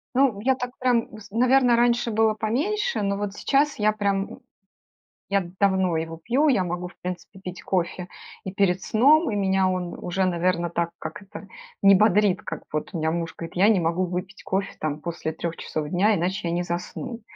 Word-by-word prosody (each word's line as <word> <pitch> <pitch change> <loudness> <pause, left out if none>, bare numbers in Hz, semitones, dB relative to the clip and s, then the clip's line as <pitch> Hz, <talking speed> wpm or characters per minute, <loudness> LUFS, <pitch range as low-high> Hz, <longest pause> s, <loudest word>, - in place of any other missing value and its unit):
Ну, 255 -6 +3
я 260 +4 +2
так 250 -1 -5
прям, 245 -2 +2
вс 215 -1 -12
наверно, 250 +1 +4
раньше 240 0 +2
было 220 0 +3
поменьше, 310 - -1
но 200 0 0
вот 205 -1 -3
сейчас 280 +7 +1
я 210 0 +4
прям 200 -2 0
м - - -11 0.9
Я 195 -1 +2 0.2
давно 190 -4 +2
его 165 0 -4
пью, 255 - +2
я 210 -9 +3
могу 180 0 -3
в - - -15
принципе 180 +2 -6
пить 185 -1 -8
кофе 180 -1 -1 0.4
и 190 - -5
перед 190 -2 +2
сном, 290 +6 +4
и - - -2
меня 190 -1 +2
он 180 -2 -2
уже, 185 +2 -1
наверно, 175 -1 0
так- 170 0 -1
как 160 +5 -7
это?- 195 0 -11 0.3
не 195 0 +7
бодрит, 210 -1 +3
как 160 - -6
вот 150 0 -3
у - - -2
меня 160 0 0
муж 165 0 -3
говорит: 165 - -8
"Я 190 +3 +5
не 215 -4 +4
могу 170 +2 0
выпить 180 +3 -5
кофе 195 +1 -2
там 150 -1 -2
после 165 -1 -4
3 165 +1 -4
часов 150 -1 -4
дня, 195 +6 +3
иначе 185 +2 -1
я 170 - -1
не 175 - 0
засну". 180 +8 -5
195 Hz, 200 wpm, -24 LUFS, 175-220 Hz, 0.9 s, не